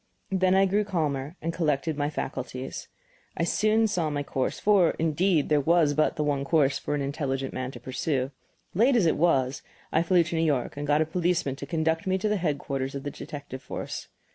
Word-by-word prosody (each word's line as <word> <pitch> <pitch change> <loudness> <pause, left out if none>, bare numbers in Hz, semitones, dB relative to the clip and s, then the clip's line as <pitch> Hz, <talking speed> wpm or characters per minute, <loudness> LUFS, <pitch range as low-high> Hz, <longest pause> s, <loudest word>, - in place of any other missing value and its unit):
Then 185 -1 +3
I 195 0 +5
grew 200 +2 +2
calmer 155 -6 -2
and 165 +1 -1
collected 155 -1 0
my 145 0 -1
faculties. 130 -3 -5 0.5
I - - +1
soon 215 +1 +3
saw 175 -7 0
my 145 -1 -2
course 135 -2 -2
for, 200 -5 +4
indeed, 165 0 +1
there 150 -1 +4
was 160 0 +3
but 155 +1 +2
the 150 - -1
one 145 -2 0
course 140 -2 +2
for 145 - -2
an 145 - -1
intelligent 135 -2 -2
man 130 0 -3
to 125 - -9
pursue. 130 +2 -2 0.4
Late 240 +8 +4
as 220 -7 +4
it 160 - +3
was, 135 -5 +2 0.3
I 160 - +3
flew 175 0 +4
to 170 +1 -4
New 160 - +1
York 145 -6 0
and 145 +1 -4
got 150 +1 +3
a - - -5
policeman 170 -4 0
to - - -7
conduct 160 +1 0
me 190 0 +2
to 190 - -1
the 210 0 +1
headquarters 140 -5 -2
of 140 - -5
the 145 - -4
detective 140 -3 -8
force. - - -6
155 Hz, 210 wpm, -27 LUFS, 140-175 Hz, 0.5 s, I